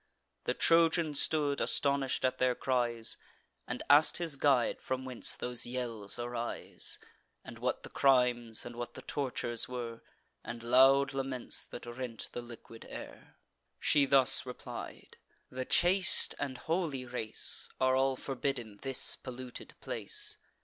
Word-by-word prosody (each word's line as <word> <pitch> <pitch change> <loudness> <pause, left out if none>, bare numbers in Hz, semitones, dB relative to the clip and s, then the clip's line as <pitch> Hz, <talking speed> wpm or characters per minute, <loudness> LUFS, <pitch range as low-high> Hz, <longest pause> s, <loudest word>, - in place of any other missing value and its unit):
The - - 0
Trojan 165 -1 +3
stood 145 -1 +1
astonish'd 140 -2 0
at 130 - -1
their 125 -1 +2
cries, 120 -3 0 0.5
And - - -4
ask'd 145 +2 +6
his 165 -4 +2
guide 135 -3 +2
from 130 0 -3
whence 125 -2 +1
those 125 -1 0
yells 120 -5 -1
arise; 120 0 -1 0.5
And - - -10
what - - -2
the - - -9
crimes, 125 -4 +2
and 120 0 -8
what 120 0 -6
the 130 - -10
tortures 125 -4 -3
were, 120 -2 -6 0.4
And 115 0 -7
loud 135 +3 +5
laments 135 -2 -1
that - - -9
rent 120 -1 -7
the 120 - -5
liquid 115 -1 -12
air. - - -10 0.4
She 145 -2 +3
thus 135 -1 +5
replied: 125 -1 -9 0.3
"The 130 0 -4
chaste 185 +6 +4
and 135 -3 -4
holy 160 -3 -2
race 120 -3 0
Are 130 0 +3
all 135 0 +2
forbidden 125 -5 -4
this 135 -1 +3
polluted 130 -1 -9
place. - - -1
130 Hz, 135 wpm, -32 LUFS, 120-140 Hz, 0.5 s, ask'd